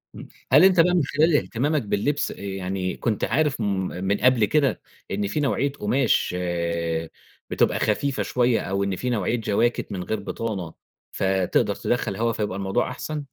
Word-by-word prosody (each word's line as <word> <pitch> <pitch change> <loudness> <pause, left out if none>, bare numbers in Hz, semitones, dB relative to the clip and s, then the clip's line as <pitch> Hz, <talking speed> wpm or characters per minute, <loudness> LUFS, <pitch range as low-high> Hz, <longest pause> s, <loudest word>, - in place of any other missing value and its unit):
امم، - - -9 0.2
هل 150 +6 +7
أنت 185 -2 +5
بقى 180 +2 +5
من 175 - +3
خلال 150 +3 +2
اهتمامك 145 +5 0
باللبس 115 +8 -1
يعني 95 -1 -4
كنت 110 -4 -1
عارف 150 -4 +1
م - - 0 0.4
من 100 +2 +1
قبل 125 -4 +4
كده 145 0 +1 0.3
إن 100 +1 -1
في 150 - -2
نوعية 140 0 +1
قماش 125 -5 +1 1.1
بتبقى - - +1
خفيفة 140 -2 0
شوية، 125 -2 +1
أو 100 +1 -1
إن 100 -1 -1
في 125 +6 -3
نوعية 115 0 0
جواكيت 115 +1 0
من 90 -2 -4
غير 110 +2 -2
بطانة 100 -5 -4 0.4
فتقدر 95 -2 +1
تدخَّل 115 -5 -1
هوا 115 +2 0
فيبقى 105 -3 -3
الموضوع 95 +5 -1
أحسن؟ 150 -2 -5
115 Hz, 160 wpm, -24 LUFS, 100-140 Hz, 1.1 s, هل